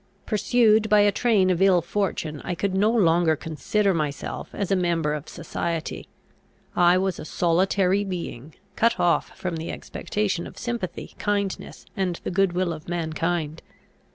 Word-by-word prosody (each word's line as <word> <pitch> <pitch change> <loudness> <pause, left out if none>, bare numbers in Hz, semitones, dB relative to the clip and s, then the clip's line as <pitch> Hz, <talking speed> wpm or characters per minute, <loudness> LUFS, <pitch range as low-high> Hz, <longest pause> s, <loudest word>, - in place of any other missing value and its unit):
Pursued 220 0 +3
by 210 0 +6
a 205 0 +5
train 200 -4 +3
of 180 0 0
ill 190 -2 +6
fortune, 170 -5 -2
I 180 - -3
could 190 +3 -1
no 200 +3 +3
longer 170 -7 +3
consider 190 +7 0
myself 150 -4 -3
as 200 -1 -3
a - - +5
member 170 -4 +1
of 150 -1 -5
society. 165 0 -4 0.7
I 175 +1 +5
was 190 -1 -1
a - - -6
solitary 185 +4 +2
being, 165 -7 -6 0.2
cut 230 +1 +2
off 175 -1 +1
from 180 -3 -3
the 160 +1 -5
expectation 200 -5 -3
of - - -13
sympathy, 235 -7 -4
kindness, 200 -2 -2
and 185 -3 -1
the - - -3
good 190 -1 +2
will 180 -1 0
of 155 +1 -10
mankind. 165 -1 -2
180 Hz, 155 wpm, -24 LUFS, 165-200 Hz, 0.7 s, by